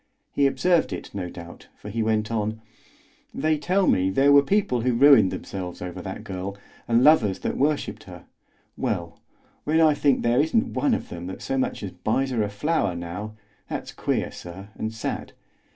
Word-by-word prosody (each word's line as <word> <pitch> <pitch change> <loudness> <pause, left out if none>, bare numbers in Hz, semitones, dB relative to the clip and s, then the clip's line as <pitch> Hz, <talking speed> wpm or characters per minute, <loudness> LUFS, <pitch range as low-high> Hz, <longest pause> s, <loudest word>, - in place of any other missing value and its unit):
He 140 - +3
observed 175 +4 +2
it, - - -7
no 95 -3 -4
doubt, 85 0 -11
for 105 - -9
he 115 +2 -1
went 110 0 0
on: 110 0 -2 0.8
"They 155 +1 +1
tell 185 +5 +1
me 95 - +3
there 135 +8 +4
were 140 0 +8
people 140 - +1
who 125 0 +1
ruined 125 -6 +7
themselves 90 -2 -6
over 90 -1 -6
that - - -7
girl, 95 +1 -5 0.3
and 115 +1 +3
lovers 120 -11 +5
that - - -2
worshipped 145 +2 -1
her; - - -11 0.5
well, 85 -1 -3 0.4
when 155 +2 +2
I 155 -2 +6
think 145 -2 +2
there 120 +3 +3
isn't 225 - +1
one 275 -5 +2
of - - -6
them 85 0 -7
that 95 - -7
so 135 - -2
much 130 - -1
as 100 - -4
buys 130 +8 -1
her 120 -3 0
a 105 - 0
flower 105 - 0
now, 90 +5 -6 0.3
that's - - -5
queer, - - -1
sir, 95 +3 -10
and 110 - -4
sad. 110 - -5
115 Hz, 185 wpm, -24 LUFS, 95-145 Hz, 0.8 s, were